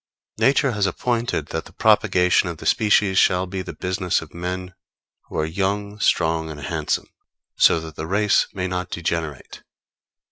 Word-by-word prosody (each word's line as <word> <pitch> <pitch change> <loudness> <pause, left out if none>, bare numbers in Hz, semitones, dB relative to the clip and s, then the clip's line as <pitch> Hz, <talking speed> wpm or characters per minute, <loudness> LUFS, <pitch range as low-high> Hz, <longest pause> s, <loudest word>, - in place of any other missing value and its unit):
Nature 135 0 +3
has 105 -3 +1
appointed 115 -5 -1
that 80 - -4
the - - -14
propagation 90 0 +3
of 85 - -6
the - - -10
species 105 -3 +3
shall 90 0 +3
be 95 0 -5
the - - -6
business 90 -1 -1
of 80 - -11
men 90 +1 -5 0.6
who - - -6
are 80 - +1
young, 100 +5 -2
strong 80 -4 +1
and 75 -1 -8
handsome; 65 - -2 0.4
so 85 - +5
that 80 -1 -9
the 80 - -4
race 100 +2 +2
may 95 -2 -3
not 90 0 -3
degenerate. 80 -4 -4
90 Hz, 165 wpm, -22 LUFS, 80-100 Hz, 0.6 s, so